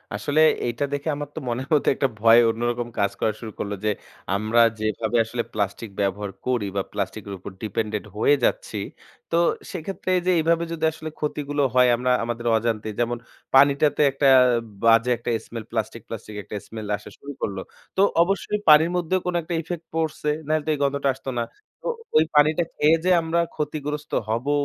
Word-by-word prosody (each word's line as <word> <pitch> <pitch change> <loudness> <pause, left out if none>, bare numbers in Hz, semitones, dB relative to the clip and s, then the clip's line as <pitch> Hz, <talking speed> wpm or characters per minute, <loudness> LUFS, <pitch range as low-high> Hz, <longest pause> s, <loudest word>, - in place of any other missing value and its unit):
আসলে 145 +9 +1 0.3
এইটা 120 +4 -1
দেখে 145 +2 -3
আমার 145 0 -5
তো - - -3
মনের 125 +3 -2
মধ্যে 150 - +3
একটা 135 - +1
ভয় 115 +1 +7
অন্যরকম 120 +1 -1
কাজ 100 - +2
করা 110 - +1
শুরু 110 -2 -7
করলো 100 0 -3
যে, - - +3 0.5
আমরা 110 +3 +2 0.2
যেভাবে 110 +2 -1
আসলে 120 +1 -3
প্লাস্টিক 105 +1 -2
ব্যবহার 100 0 -1
করি 125 -5 0
বা - - +2
প্লাস্টিকের 100 0 -4
উপর 95 - -8
ডিপেন্ডেন্ট 105 0 -2
হয়ে 145 +6 +4
যাচ্ছি। 105 - 0 0.5
তো 165 - +2 0.3
সেক্ষেত্রে 185 +2 -5
এইযে, 180 +1 +1
এভাবে 165 +1 +2
যদি 160 -1 -5
আসলে 155 0 -7
ক্ষতিগুলো 145 -1 -2
হয় 125 -1 +5
আমরা, 125 +1 0
আমাদের 120 0 -4
অজান্তে 110 -1 -2
যেমন 120 0 0 0.4
পানিটাতে 140 +2 +5
একটা 140 +1 +1 0.6
বাজে 115 +2 +5
একটা 120 - -5 0.2
স্মেল 115 -2 -7
প্লাস্টিক, 115 0 -3
প্লাস্টিক 110 -1 -8
একটা 105 - -8
স্মেল 110 -2 -7
আসা 105 - -12
শুরু 145 - -9
করল। 100 -2 -2 0.4
তো - - +4 0.2
অবশ্যই 195 +2 -1
পানির 160 +3 +7
মধ্যেও 180 +2 0
কোনো 180 -1 -1
একটা 170 +2 -5
ইফেক্ট 170 0 -6
পড়ছে, 155 -2 -1 0.2
নাইলে 155 -1 +1
তো - - -3
এই - - -2
গন্ধটা 140 0 +1
আসতো 135 - -8
না। - - +1 0.4
তো - - -6 0.3
ওই 155 - +6
পানিটা 155 +3 +4
খেয়ে 155 +2 +4
যে 185 - +4
আমরা 165 +1 0 0.2
ক্ষতিগ্রস্ত 150 0 -4 0.2
হবো 120 +6 0
125 Hz, 180 wpm, -24 LUFS, 110-150 Hz, 0.6 s, ভয়